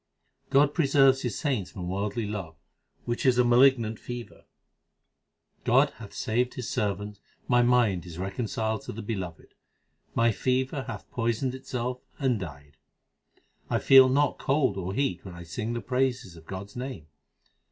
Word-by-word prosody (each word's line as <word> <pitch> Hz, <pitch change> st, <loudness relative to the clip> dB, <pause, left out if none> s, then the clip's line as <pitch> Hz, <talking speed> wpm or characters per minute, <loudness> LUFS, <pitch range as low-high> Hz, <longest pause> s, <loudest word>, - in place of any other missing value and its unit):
God 140 Hz, +1 st, +4 dB
preserves 135 Hz, -4 st, +4 dB
His 120 Hz, -6 st, -2 dB
saints 130 Hz, -, -1 dB
from 90 Hz, -3 st, -7 dB
worldly 100 Hz, +4 st, -2 dB
love, 95 Hz, -6 st, -5 dB, 0.5 s
which 120 Hz, 0 st, -2 dB
is 130 Hz, -2 st, +4 dB
a 125 Hz, -, +5 dB
malignant 120 Hz, -2 st, +4 dB
fever: 120 Hz, -1 st, -8 dB, 1.2 s
God -, -, +4 dB
hath -, -, -10 dB
saved 125 Hz, +3 st, -1 dB
His 125 Hz, -, -5 dB
servant, 105 Hz, 0 st, -2 dB, 0.3 s
My 125 Hz, -1 st, +4 dB
mind 120 Hz, -8 st, +2 dB
is 85 Hz, -1 st, -9 dB
reconciled 110 Hz, +3 st, -2 dB
to -, -, -6 dB
the 115 Hz, -, -7 dB
Beloved; 95 Hz, -6 st, -5 dB, 0.6 s
my 115 Hz, 0 st, +4 dB
fever 130 Hz, +4 st, -1 dB
hath -, -, -7 dB
poisoned 120 Hz, +2 st, -1 dB
itself 125 Hz, -1 st, -4 dB, 0.2 s
and 130 Hz, -6 st, +1 dB
died. 75 Hz, -5 st, -9 dB, 0.9 s
I -, -, +2 dB
feel 135 Hz, -1 st, +7 dB
not 145 Hz, +2 st, +2 dB
cold 135 Hz, -6 st, +1 dB
or 95 Hz, 0 st, -4 dB
heat 135 Hz, -10 st, -1 dB
when 90 Hz, -3 st, -9 dB
I 85 Hz, -, -9 dB
sing 110 Hz, +7 st, -4 dB
the 120 Hz, -, -3 dB
praises 125 Hz, -7 st, -1 dB
of 80 Hz, -1 st, -15 dB
God 95 Hz, +1 st, -6 dB
s -, -, -18 dB
name. 125 Hz, -, -6 dB
120 Hz, 155 wpm, -27 LUFS, 100-130 Hz, 1.2 s, feel